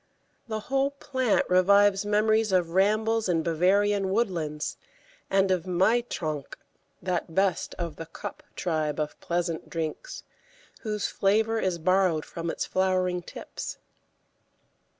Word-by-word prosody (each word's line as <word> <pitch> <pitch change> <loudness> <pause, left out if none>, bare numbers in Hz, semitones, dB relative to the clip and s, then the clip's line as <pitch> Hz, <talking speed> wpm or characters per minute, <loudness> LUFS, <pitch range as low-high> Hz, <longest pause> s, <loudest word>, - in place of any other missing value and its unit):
The 220 -1 -3
whole 270 +4 +1
plant 260 -5 0
revives 200 +2 +4
memories 215 +1 +2
of 180 -3 +2
rambles 215 +3 +2
in 165 -2 +2
Bavarian 195 +4 +2
woodlands, 170 -8 -1 0.5
and 195 0 +3
of 185 -1 0
Mai 190 +7 +3
trank, 155 -4 -4 0.5
that 175 -2 -2
best 190 -3 +1
of 170 -4 -4
the 165 - -7
"cup" 290 - -8
tribe 155 -4 -1
of 150 -1 -3
pleasant 170 -1 -2
drinks, 165 - -5 0.6
whose 210 -2 -3
flavour 220 +3 +1
is 185 -4 0
borrowed 180 -2 +2
from 170 0 -5
its - - -2
flowering 185 -1 +1
tips. - - -7
190 Hz, 125 wpm, -27 LUFS, 170-210 Hz, 0.6 s, revives